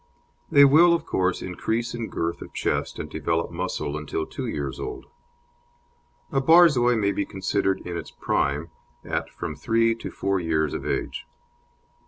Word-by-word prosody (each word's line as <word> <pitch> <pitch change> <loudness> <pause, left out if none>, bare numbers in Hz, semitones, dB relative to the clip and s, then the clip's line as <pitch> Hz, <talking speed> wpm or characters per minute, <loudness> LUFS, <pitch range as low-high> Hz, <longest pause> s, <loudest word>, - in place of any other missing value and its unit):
They 140 -3 +8
will, 170 +5 +6
of 170 - -4
course, 95 -1 0
increase 110 +6 -2
in 120 -2 -4
girth 85 +1 -3
of - - -10
chest - - -1
and - - -5
develop 80 +1 -2
muscle 85 -4 -3
until 75 -1 -3
two - - -6
years 70 -1 -4
old; 420 -1 -6 1.3
a 135 -3 +1
Borzoi 140 -6 +6
may 100 -3 +1
be 100 - -1
considered 95 0 -1
in 90 - -6
its - - -5
prime 75 +4 -1 0.3
at - - -2
from 75 - -6
three 115 +9 +2
to 115 - -7
four 100 -1 -1
years 80 -3 0
of - - -4
age. - - -3
100 Hz, 160 wpm, -25 LUFS, 85-120 Hz, 1.3 s, They